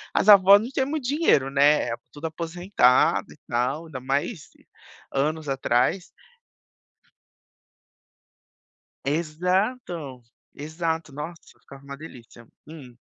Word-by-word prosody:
as - - +1
avós 200 0 +8
não 230 - -5
tinham 265 0 -1
muito 305 -3 -3
dinheiro, 280 - +2
né, 140 -2 +3 0.2
tudo 150 +2 -9
aposentado 165 -4 +1
e - - -15
tal, 125 +7 -1
ainda 135 -5 -7
mais 140 - -2 0.7
anos 155 +3 -1
atrás. 135 +7 0 3.0
Exato, 170 - -2 0.3
exato, 160 0 -4
nossa, 160 +4 -9
ficava 140 0 -15
uma 140 0 -8
delícia, 120 -6 -13 0.2
hum. 140 -6 -12
155 Hz, 100 wpm, -24 LUFS, 135-180 Hz, 3.0 s, avós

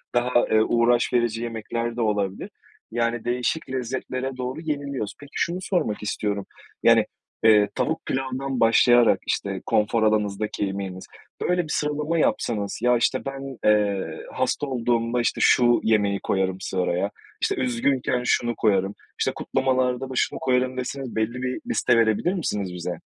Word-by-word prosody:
daha, 120 0 +2
eee, 110 - +5
uğraş 120 +2 +2
verici 120 -1 +1
yemekler 115 +1 -3
de 120 - 0
olabilir. 100 -3 -1 0.4
Yani, 115 0 -1
değişik 125 +6 -1
lezzetlere 130 +1 -3
doğru 130 +4 -4
yeniliyoruz. 140 -8 -3
Peki, 145 0 -13
şunu 170 +2 0
sormak 175 - -1
istiyorum, 100 -1 -2 0.4
yani, - - +6 0.4
eee, 105 -2 +6
tavuk - - -1
pilavdan 130 0 -2
başlayarak, 120 +1 +5
işte, - - -2
konfor 110 +1 +2
alanınızdaki 105 -1 0
yemeğiniz, 95 -1 -5 0.4
böyle 180 0 +1
bir 155 - -11
sıralama 150 +2 -1
yapsanız 105 -8 0
"Ya, 125 0 +4
işte, 130 +2 0
ben, 135 -1 -6
eee, 105 -4 +2 0.3
hasta 130 +3 -1
olduğumda, 120 -1 0
işte, - - 0
şu 120 -1 +5
yemeği 105 -3 +2
koyarım 95 -1 0
sıraya, 95 +1 -1 0.3
işte, - - +1
üzgünken 125 0 0
şunu 120 -1 +1
koyarım, 100 -2 +1 0.2
işte, - - +1
kutlamalarda 130 0 0
da - - -6
şunu - - 0
koyarım." 130 0 +1
deseniz 130 -1 -4
belli 115 +3 -1
bir 130 0 -2
liste 125 - +2
verebilir 115 - +2
misiniz 105 - -2
bize? 90 0 -5
120 Hz, 145 wpm, -24 LUFS, 105-130 Hz, 0.4 s, yani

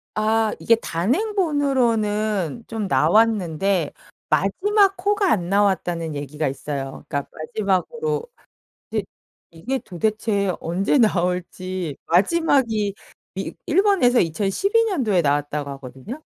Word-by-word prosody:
아. 220 0 +2
이게 230 - +4
단행본으로는 230 - 0
좀 220 -3 -3
나왔는데 190 -3 +2 0.4
마지막 390 - +3
호가 410 -3 +2
안 175 -4 0
나왔다는 175 -5 +1
얘기가 145 +1 -3
있어요. 135 0 -5
그러니까 140 -1 -3
마지막으로 220 - -1 0.7
근데 - - -1 0.5
이게 250 +11 -3
도대체 205 0 -1
언제 185 - 0
나올지. 180 - 0
마지막이 220 - +2 0.4
이 - - -4
일본에서 380 - +3
2012 210 - +1
년도에 235 - +1
나왔다고 145 0 -1
하거든요. 135 - -9
205 Hz, 260 characters per minute, -22 LUFS, 170-255 Hz, 0.7 s, 이게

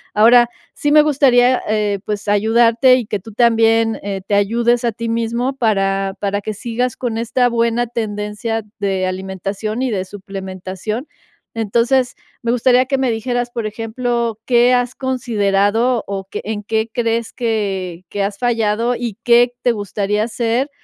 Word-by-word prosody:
Ahora, 240 +3 +6 0.3
sí 290 - 0
me 300 0 +7
gustaría, 260 -4 +4
eh, 210 -2 0
pues, 210 0 -4
ayudarte 230 +4 +4
y 250 -3 -1
que 210 - -2
tú 220 +4 -12
también, 225 -1 +3
eh, 195 -1 -4
te 205 - +1
ayudes 235 +4 +2
a 235 - +2
ti 230 +2 -9
mismo 235 +3 -1
para 195 -5 0
para 200 0 -1
que 215 +2 -4
sigas 235 +3 -2
con 235 -3 -3
esta 245 +2 +1
buena 235 0 +1
tendencia 215 0 -3 0.2
de 195 -2 0
alimentación 190 +4 -4
y 260 - 0
de 190 -3 -2
suplementación. 195 - -6 0.5
Entonces, 235 +4 +1 0.3
me 235 - +1
gustaría 250 +1 +3
que 270 +1 0
me 260 -2 +1
dijeras, 245 +2 -2
por 230 -2 -4
ejemplo, 230 +1 -2
¿qué 245 0 +4
has 245 0 0
considerado, 230 -2 +1
o 195 -1 -4
qué - - -5
en 210 0 -4
qué 220 +1 -1
crees 230 -1 -1
que 195 -7 -2
que 205 - -2
has 200 0 -3
fallado, 230 0 0
y 235 -4 -4
qué 240 0 +4
te 245 - +4
gustaría 205 0 -1
hacer 235 +4 -1
225 Hz, 160 wpm, -18 LUFS, 205-240 Hz, 0.5 s, me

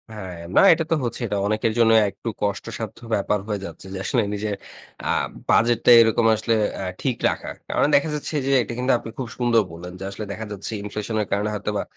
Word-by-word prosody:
হ্যাঁ। 95 -4 -7 0.2
না, - - +7
এটা 165 - -1
তো - - +5
হচ্ছেই। 120 +1 -3
এটা 100 - -2
অনেকের 110 +1 0
জন্য 115 -1 +5 0.2
একটু 115 - -11
কষ্টসাধ্য 105 +1 -3 0.2
ব্যাপার 105 +1 0
হয়ে 105 -2 -2
যাচ্ছে - - -9
যে, - - -4
আসলে 120 - +2
নিজের 105 0 -2 0.5
আ - - -1 0.4
বাজেটটা 120 +1 +4
এরকম 115 0 +3
আসলে 115 +2 0 0.2
অ্যা 95 - -4 0.2
ঠিক 130 -4 -1
রাখাটা। - - -5
কারণ - - +2
দেখা 145 +3 +3
যাচ্ছে 150 +1 -3
যে, 140 - +2
এটা 120 - -6
কিন্তু 130 +1 +1
আপনি - - -8
খুব 130 -3 -3
সুন্দর 120 -2 +3
বললেন 90 +2 -9
যে - - -6
আসলে 100 +2 -6
দেখা 110 +2 -5
যাচ্ছে 100 +2 -4
ইনফ্লেশনের 105 0 -3
কারণে 105 +1 0
হয়তোবা 105 0 -2
110 Hz, 200 wpm, -23 LUFS, 100-120 Hz, 0.5 s, না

